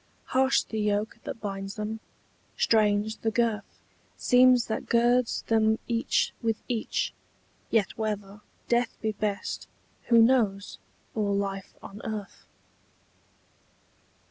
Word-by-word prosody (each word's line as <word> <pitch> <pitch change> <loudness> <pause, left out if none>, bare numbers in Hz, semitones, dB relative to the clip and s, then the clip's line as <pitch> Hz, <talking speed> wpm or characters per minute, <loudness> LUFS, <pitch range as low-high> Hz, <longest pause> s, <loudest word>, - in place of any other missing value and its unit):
Harsh 265 +1 +4
the 220 - -5
yoke 210 +2 -1
that - - -5
binds 195 -1 -5
them, 215 +1 -4 0.6
strange 215 0 +2
the 225 - -1
girth 225 -2 -1 0.3
Seems 250 -1 +5
that 220 - -4
girds 240 +1 +2
them 220 -1 +3
each 235 0 +1
with 225 -2 0
each: 235 -3 -1 0.6
yet 210 -4 +1
whether 210 -2 -3 0.3
Death 240 0 +1
be 220 - +1
best, 205 -1 -3 0.4
who 235 -1 +5
knows, 225 -5 +2 0.3
or 205 -2 0
life 195 -1 -3
on 200 +2 -9
earth? 215 -3 -6
220 Hz, 115 wpm, -27 LUFS, 205-235 Hz, 0.6 s, Seems